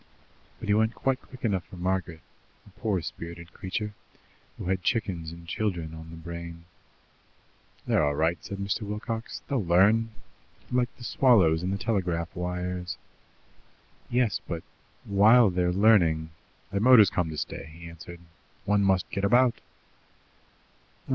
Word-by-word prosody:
But - - -7
he 105 - +3
went 110 +2 +2
quite 135 -1 0
quick 130 -1 -9
enough 95 -5 0
for - - -12
Margaret, 90 -2 -2 0.4
a 105 - -17
poor 95 -3 -2
spirited 85 +3 -8
creature, 105 +3 -4 0.6
who - - -6
had 95 0 0
chickens 90 -6 -1
and 85 0 -11
children 85 -4 -2
on 80 0 -9
the 80 - -9
brain. 85 0 -8 1.2
"They're - - +2
all 75 -1 +1
right," 80 +3 0
said 100 - -6
Mr. 100 +3 -2
Wilcox. 105 +2 -5
"They'll 135 -6 0
learn 100 +6 +4 0.6
like 125 -1 +2
the 120 - -11
swallows 95 -12 +4
and 90 +1 -2
the 100 - -1
telegraph 90 -6 -1
wires." 90 0 -3 1.1
"Yes, 120 -4 +1
but, 85 -1 -4 0.4
while 105 +2 +6
they're 90 0 +1
learning 90 -6 +4 0.2
" - - -35
"The 100 - 0
motor's 115 -2 +7
come 90 -3 0
to 80 - -6
stay," 75 - -5
he 85 +1 -11
answered. 85 +1 -11 0.4
"One 105 0 +3
must 95 -2 +2
get 100 - -2
about. 120 +3 +3
95 Hz, 150 wpm, -27 LUFS, 85-105 Hz, 1.2 s, motor's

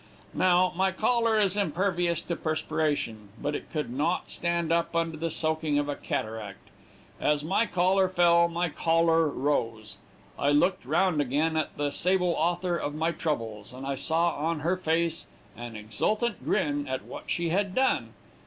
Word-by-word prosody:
Now, 180 0 +3
my 190 +1 +2
collar 225 +3 +2
is 200 -2 +2
impervious 175 -2 0
to 170 - -3
perspiration, 150 -9 -2
but 145 +1 -2
it - - -6
could 150 -6 -3
not 160 +7 -1
stand 170 -1 -1
up 170 0 0
under 165 -1 0
the 165 +2 -2
soaking 155 -2 0
of 145 0 0
a 145 - -2
cataract; 110 -3 -5 0.5
as 150 -1 +1
my 195 +8 +1
collar 185 +1 +2
fell 170 -1 +4
my 170 +1 -1
choler 165 +1 +2
rose; 115 -7 -2 0.4
I 140 - +2
looked 145 0 +2
around 170 +1 +2
at 155 +4 0
the 145 0 0
sable 180 +1 +1
author 175 +2 0
of 145 -2 -4
my 160 +2 0
troubles, 115 -10 -3
and 130 +1 -8
I 140 - -1
saw 165 +5 +1
on 155 +1 -1
her 170 +4 +1
face 165 -2 -1 0.3
an 120 0 -8
exultant 160 - -1
grin 145 -7 0
at 130 0 -3
what - - -9
she 170 -1 -1
had 195 +2 0
done. 260 0 +1
165 Hz, 165 wpm, -28 LUFS, 145-175 Hz, 0.5 s, fell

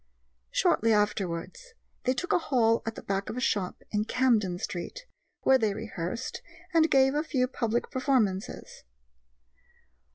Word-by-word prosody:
Shortly 225 +1 +2
afterwards 210 - -2 0.3
they 255 +1 +2
took 360 - -1
a - - +4
hall 235 -7 +2
at 225 - -2
the - - -9
back 195 0 -2
of - - -5
a - - 0
shop 200 -6 -1
in 210 0 0
Camden 225 -8 +2
Street, 335 - -5 0.4
where 265 0 +5
they 215 -4 +1
rehearsed 220 +1 -5 0.3
and 325 -1 +5
gave 270 0 +4
a 295 - +1
few 260 -5 0
public 235 -2 -2
performances. 235 -7 -1
230 Hz, 140 wpm, -28 LUFS, 205-265 Hz, 0.4 s, where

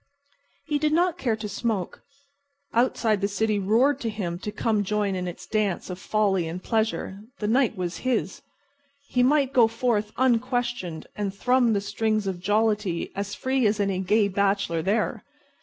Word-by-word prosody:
He 295 -1 0
did 305 +1 +1
not 350 +1 +2
care 235 -7 +1
to 215 -1 -6
smoke. 205 -2 -3 0.7
Outside 230 -3 +2
the 200 - +2
city 210 +1 0
roared 230 +9 +3
to 230 - -2
him 180 -5 -4
to 210 - -5
come 215 -1 0
join 205 0 0
in 180 -1 -3
its 175 - -7
dance 205 -4 -1
of 180 - -6
folly 195 -5 +1
and 175 +3 -6
pleasure. 220 -3 -1 0.2
The 210 - -2
night 245 +2 +2
was 180 -2 -3
his. 255 -1 -1 0.7
He 250 - +2
might 275 +1 +3
go 235 -3 +6
forth 225 -2 0
unquestioned 245 -8 0
and 205 -2 -2
thrum 245 +3 +2
the 200 - +1
strings 215 +1 -1
of 190 -2 -3
jollity 205 -2 0
as 200 +1 -3
free 260 -3 +1
as 210 +1 0
any 195 -2 0
gay 205 +3 +3
bachelor 200 -4 0
there. 205 +6 0
210 Hz, 170 wpm, -25 LUFS, 195-240 Hz, 0.7 s, go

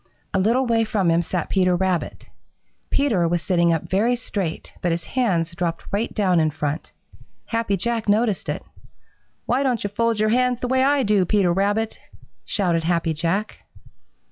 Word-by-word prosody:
A 195 - +2
little 235 +7 +2
way 230 -1 +2
from 205 -6 +1
him 165 +1 +3
sat 175 -1 -3
Peter 185 -2 +3
Rabbit. 185 -1 -2 0.6
Peter 220 -12 +2
was 170 0 -1
sitting 170 -2 +2
up 165 -2 0
very 220 +6 +2
straight, 195 -8 -4
but 175 - 0
his 170 0 -2
hands 175 -5 0
dropped 170 -1 -3
right 210 +4 -1
down 185 -5 +2
in 155 -1 +3
front. 150 +1 -4 0.5
Happy 230 -4 -1
Jack 230 +2 -1
noticed 210 -1 +1
it. - - -3 0.8
"Why 255 +3 +1
don't 255 -5 0
you 205 - -3
fold 230 +1 0
your 215 0 +2
hands 250 +1 +2
the 250 - -2
way 260 +1 +2
I 280 0 +3
do, 205 -3 +3
Peter 180 -1 +2
Rabbit?" 205 +4 0 0.4
shouted 175 -5 0
Happy 165 -1 0
Jack. 170 +7 -2
200 Hz, 170 wpm, -22 LUFS, 170-230 Hz, 0.8 s, him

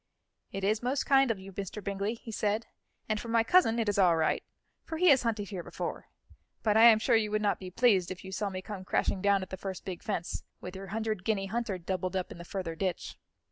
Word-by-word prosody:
"It 195 0 -5
is 215 +2 +2
most 255 +3 0
kind 270 -2 +5
of 225 - 0
you, 190 0 -11
Mr. 200 +2 -5
Bingley," 200 +3 -2
he 230 0 -10
said; 215 +1 0 0.4
"and 215 -1 0
for - - -8
my 230 0 +3
cousin, 235 -3 +4
it 225 -2 0
is 205 -1 +1
all 180 -3 +5
right, 160 - +1 0.4
for 320 - -5
he 360 +2 +5
has 270 -3 +6
hunted 215 -4 -2
here 190 -4 -4
before. - - -5 0.6
But 215 -2 +2
I 225 +1 +8
am 230 -2 +9
sure 235 +2 +2
you 215 -1 +2
would 215 0 +1
not 205 - +1
be 185 - -7
pleased, 195 -3 +3
if 185 0 -7
you 190 - -7
saw 200 +2 -2
me 185 -1 -6
come 200 -3 -6
crashing 185 +1 0
down 200 -1 +3
at 185 - -10
the 190 - -4
first 190 -1 -6
big 185 -3 -5
fence, 180 -6 -3 0.2
with 180 +1 -8
your 195 +1 -7
hundred 215 -1 -2
guinea 205 -2 0
hunter 220 -1 -2
doubled 185 +1 -3
up 185 -1 -2
in - - -9
the - - -7
further 180 -3 -4
ditch." 180 +1 -3
200 Hz, 250 wpm, -30 LUFS, 190-225 Hz, 0.6 s, am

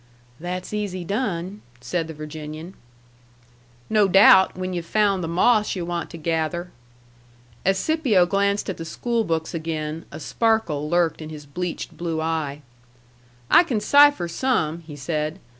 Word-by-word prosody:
"That's 180 +4 -5
easy 200 -4 -3
done," 200 -1 -3 0.2
said 160 +7 -2
the 160 - -7
Virginian. 155 +3 -8 1.1
"No 215 -2 +3
doubt, 190 0 +6
when 185 0 -3
yu've 175 -1 -3
found 200 0 +1
the - - -2
moss 210 +6 +2
yu' 175 -2 -3
want 170 -1 -3
to 170 - -9
gather." 165 +2 -2 0.9
As 195 +1 +2
Scipio 255 - +2
glanced 200 +2 0
at 190 - -4
the 165 - -6
school 235 +7 -1
books 165 -3 -2
again, 160 -1 -4
a 155 - -8
sparkle 170 -7 0
lurked 170 -1 +1
in 155 - -7
his 150 -2 -9
bleached 170 +1 -5
blue 165 -1 -2
eye. 155 -3 -2 0.9
"I - - +9
can 255 -11 -1
cipher 285 -2 +5
some," 170 -5 0
he 150 - -8
said. 150 +2 -3
175 Hz, 150 wpm, -23 LUFS, 160-200 Hz, 1.1 s, I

